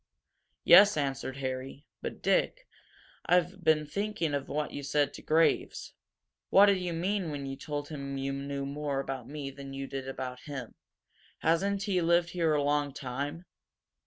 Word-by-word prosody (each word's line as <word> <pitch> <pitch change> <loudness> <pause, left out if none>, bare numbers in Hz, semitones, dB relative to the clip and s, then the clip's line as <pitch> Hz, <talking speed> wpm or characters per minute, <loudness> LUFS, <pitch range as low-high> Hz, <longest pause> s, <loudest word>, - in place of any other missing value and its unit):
"Yes," 200 +1 +8
answered 135 -2 -2
Harry. 135 +2 -5 0.2
"But, - - -6
Dick, - - +1 0.6
I've 180 +1 +2
been 155 -1 +3
thinking 200 -2 -2
of 140 -1 -2
what 150 +1 -2
you 145 - -5
said 145 0 +1
to - - -9
Graves. 160 +1 +1 0.6
What 200 - +8
did 200 -2 +3
you 180 -1 -2
mean 180 +2 -1
when 145 -2 -4
you 135 0 -4
told 145 +1 -5
him 140 -3 -5
you 135 0 -2
knew 140 0 -4
more 140 0 -2
about 135 -3 -4
me 145 -2 -5
than 135 0 -9
you 135 0 -4
did 135 -1 -6
about 130 -1 -5
him? 135 -5 -6 0.7
Hasn't 195 +5 +1
he 195 -3 +1
lived 170 +1 +3
here 165 -3 +1
a 145 - +1
long 145 -1 +1
time?" 145 +6 -4
145 Hz, 165 wpm, -30 LUFS, 135-170 Hz, 0.7 s, Yes